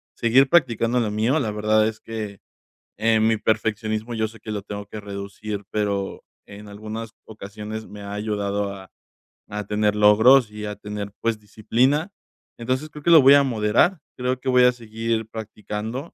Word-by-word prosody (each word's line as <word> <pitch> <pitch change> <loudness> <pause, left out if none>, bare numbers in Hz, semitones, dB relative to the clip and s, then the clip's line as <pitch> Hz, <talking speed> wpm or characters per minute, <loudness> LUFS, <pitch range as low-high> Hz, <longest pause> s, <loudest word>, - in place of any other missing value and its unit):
seguir 125 +4 +4
practicando 125 -6 +2
lo 110 - 0
mío. 115 +8 +1
La 115 -7 -1
verdad 110 +1 +2
es 110 0 -5
que, 110 -3 -6 0.6
eh, 110 0 +3
mi 110 0 +3
perfeccionismo, 110 +1 -1
yo 110 -1 0
sé 115 +1 -15
que 110 - -8
lo 100 -2 -4
tengo 100 0 -7
que 110 - -8
reducir, 100 +1 -6
pero 100 -2 -2 0.2
en 105 +1 -11
algunas 110 +2 -7 0.2
ocasiones 110 0 -8
me 105 - -11
ha 100 0 -7
ayudado 105 -1 -2
a 95 -1 -12 0.6
a 105 0 -5
tener 105 0 +1
logros 105 +4 +6
y 105 0 -7
a 105 0 -5
tener, 105 -1 -6
pues, 115 -1 0
disciplina. 125 - 0 0.5
Entonces 130 +6 -2
creo 150 -1 -11
que 170 - +3
lo 160 - +9
voy 135 +1 +8
a 140 - +5
moderar. 120 - +2 0.2
Creo 125 0 -1
que 130 - -3
voy 125 0 +5
a 125 - +6
seguir 115 -1 -3
practicando, 110 +5 -6
110 Hz, 175 wpm, -23 LUFS, 105-120 Hz, 0.6 s, lo